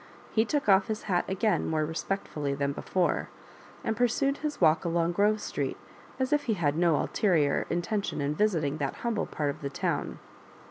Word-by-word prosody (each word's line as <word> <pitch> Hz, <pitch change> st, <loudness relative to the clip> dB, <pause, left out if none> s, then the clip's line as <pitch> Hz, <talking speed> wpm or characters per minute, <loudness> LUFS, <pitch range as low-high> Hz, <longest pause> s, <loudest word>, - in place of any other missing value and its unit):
He 220 Hz, 0 st, +3 dB
took 285 Hz, +2 st, -1 dB
off 195 Hz, +1 st, +5 dB
his 220 Hz, -1 st, -3 dB
hat 180 Hz, -4 st, +1 dB
again 195 Hz, +3 st, +1 dB
more 155 Hz, -1 st, +1 dB
respectfully 155 Hz, -3 st, -3 dB
than 140 Hz, 0 st, 0 dB
before, 175 Hz, +5 st, -1 dB, 0.5 s
and 225 Hz, -, -1 dB
pursued 275 Hz, +4 st, +1 dB
his 300 Hz, -1 st, -4 dB
walk 155 Hz, +1 st, +4 dB
along 170 Hz, 0 st, +1 dB
Grove 210 Hz, +4 st, +2 dB
Street, -, -, -3 dB, 0.4 s
as 260 Hz, +2 st, +1 dB
if 295 Hz, 0 st, +2 dB
he 220 Hz, -, +1 dB
had 150 Hz, -5 st, +1 dB
no 170 Hz, -1 st, +3 dB
ulterior 155 Hz, -5 st, +1 dB
in 175 Hz, +1 st, 0 dB
tention 205 Hz, -4 st, -2 dB
in 145 Hz, +1 st, 0 dB
visiting 155 Hz, -6 st, +1 dB
that 140 Hz, -3 st, -2 dB
humble 230 Hz, -3 st, 0 dB
part 145 Hz, -2 st, -1 dB
of 140 Hz, -, -11 dB
the 140 Hz, -, -3 dB
town. 140 Hz, -, -2 dB
175 Hz, 185 wpm, -28 LUFS, 150-215 Hz, 0.5 s, off